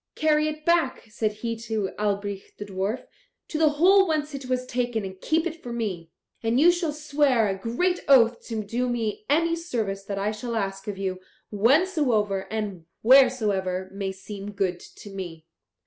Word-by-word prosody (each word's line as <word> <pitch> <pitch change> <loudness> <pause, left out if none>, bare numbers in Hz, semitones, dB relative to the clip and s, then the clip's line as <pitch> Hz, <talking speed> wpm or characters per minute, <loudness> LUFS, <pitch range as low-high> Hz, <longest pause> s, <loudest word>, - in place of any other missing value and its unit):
'Carry 305 -1 +3
it 305 0 -5
back,' 340 -6 +2
said 215 0 0
he 230 0 -1
to 220 -4 -3
Albrich 200 -1 -2
the 205 - -6
dwarf, 200 +4 -3 0.4
'to 310 - -3
the 315 -1 +5
hole 375 +6 +5
whence 305 -2 -1
it 270 -2 -6
was 255 0 -1
taken, 245 -4 -1
and 190 0 -9
keep 320 +2 +1
if 330 -1 -4
for 245 - -7
me. 195 -8 -3 0.3
And 230 +2 +1
you 335 +4 +7
shall 345 -3 -1
swear 290 -6 +2
a 195 - 0
great 240 - 0
oath 240 -4 +5
to 220 -2 -3
do 240 +5 -1
me 225 -3 -2
any 335 +3 +3
service 225 - -3
that 200 0 -4
I 200 +2 0
shall 230 +2 -5
ask 195 -2 -3
of 205 -2 -4
you, 190 -1 -3 0.3
whensoever 230 - +2
and 200 -6 -4 0.2
wheresoever 210 -8 +4
may 195 -1 -3
seem 200 +1 -8
good 190 -3 -1
to 205 - -12
me.' 175 -5 -7
225 Hz, 180 wpm, -25 LUFS, 195-290 Hz, 0.4 s, you